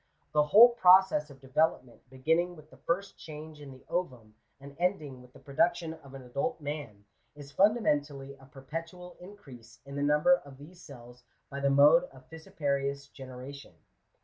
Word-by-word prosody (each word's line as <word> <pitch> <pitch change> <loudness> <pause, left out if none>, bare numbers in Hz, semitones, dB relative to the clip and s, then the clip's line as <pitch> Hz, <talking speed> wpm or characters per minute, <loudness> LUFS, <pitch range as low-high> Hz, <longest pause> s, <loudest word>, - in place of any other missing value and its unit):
The 150 - +3
whole 215 +11 +8
process 185 -8 +4
of 135 -2 -16
development, 135 -3 -2
beginning 160 +7 0
with 155 -1 -17
the - - -17
first 190 +4 -3
change 155 -1 -10
in 140 -2 -10
the 130 -1 -16
ovum, 125 -12 -4 0.3
and 140 +1 -13
ending 155 -8 -2
with 125 0 -18
the - - -17
production 165 +3 -1
of 140 -4 -14
an 135 - -10
adult 140 - -3
man, 145 -9 -7 0.3
is 145 -1 -12
funda 215 +8 +3
mentally 140 -4 -2
a 135 - -17
perpetual 165 +7 -9
increase 165 - -14
in 140 0 -9
the 140 - -3
number 150 - +3
of 140 -2 -14
these 170 +6 -15
cells 125 -3 -14 0.3
by 140 - -5
the 140 0 +1
mode 150 +5 +5
of 130 -5 -18
fissiparous 140 -5 -3
generation. 135 +1 -11
145 Hz, 170 wpm, -29 LUFS, 135-170 Hz, 0.3 s, whole